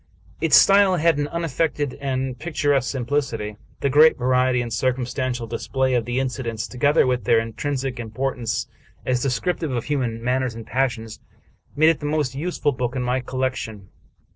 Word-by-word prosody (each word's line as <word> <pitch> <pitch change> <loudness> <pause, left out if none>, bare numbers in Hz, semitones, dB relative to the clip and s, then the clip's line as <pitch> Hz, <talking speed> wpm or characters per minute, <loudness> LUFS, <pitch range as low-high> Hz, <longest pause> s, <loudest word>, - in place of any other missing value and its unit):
Its 160 -3 +4
style 195 -1 +6
had 165 -3 +2
an 145 - 0
unaffected 160 -3 -1
and 130 -2 -2
pictur 150 -3 0
esque 130 -3 +1
simplicity. 120 -5 -2 0.2
The 140 - +1
great 155 +3 +6
variety 125 0 +2
and 120 -1 -3
circumstantial 125 0 -1
dis 115 +1 -6
play 130 -1 +1
of 120 -2 +1
the 120 +1 -1
incidents, 120 -4 -3
together 140 +8 +2
with 125 -4 0
their 115 - +4
intrinsic 130 +3 -3
importance 115 0 -2 0.4
as 125 -1 +1
descriptive 155 +5 -1
of 120 -3 -2
human 125 -6 -2
manners 125 -1 0
and 115 -1 -8
passions, 115 -4 -2 0.6
made 155 +2 +5
it 165 - +1
the 145 - -4
most 150 -4 0
useful 150 +1 -1
book 125 -1 -3
in 125 - -1
my 125 +1 0
collection. 125 -6 -4
130 Hz, 165 wpm, -23 LUFS, 120-145 Hz, 0.6 s, style